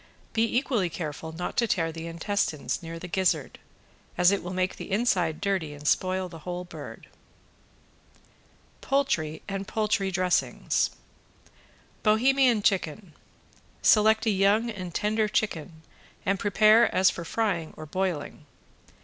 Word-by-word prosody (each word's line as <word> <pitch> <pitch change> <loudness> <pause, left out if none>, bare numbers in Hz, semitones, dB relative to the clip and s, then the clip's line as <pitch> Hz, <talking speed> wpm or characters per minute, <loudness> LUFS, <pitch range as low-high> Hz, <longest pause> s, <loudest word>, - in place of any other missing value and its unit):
Be 225 0 +3
equally 240 -9 0
careful 160 -1 -6
not 170 +2 -5
to 235 - +3
tear 165 -5 0
the 165 +1 -7
intestines 170 -2 -2
near 165 0 -7
the 180 - -7
gizzard, 175 -6 0 0.6
as 180 +1 +5
it 200 - 0
will 175 - -6
make 185 0 -1
the - - -8
inside 190 -7 +1
dirty 185 -7 -1
and 145 +1 -7
spoil 185 +2 +1
the 165 -2 -11
whole 180 +2 -5
bird. 175 - -10 1.8
POULTRY 170 - 0
AND 195 0 -4
POULTRY 210 -3 0
DRESSINGS 185 -1 +1 1.1
~BOHEMIAN 240 +1 +3
CHICKEN~ 185 -2 0 0.7
Select 220 +1 +5
a 220 - +3
young 205 +4 +2
and 185 -4 -6
tender 215 +1 +1
chicken 165 -6 -2 0.4
and 195 -1 +1
prepare 215 +3 +5
as 185 0 +5
for 170 - -6
frying 175 -4 -1
or 155 - -7
broiling. 155 -3 -3
185 Hz, 130 wpm, -27 LUFS, 165-215 Hz, 1.8 s, as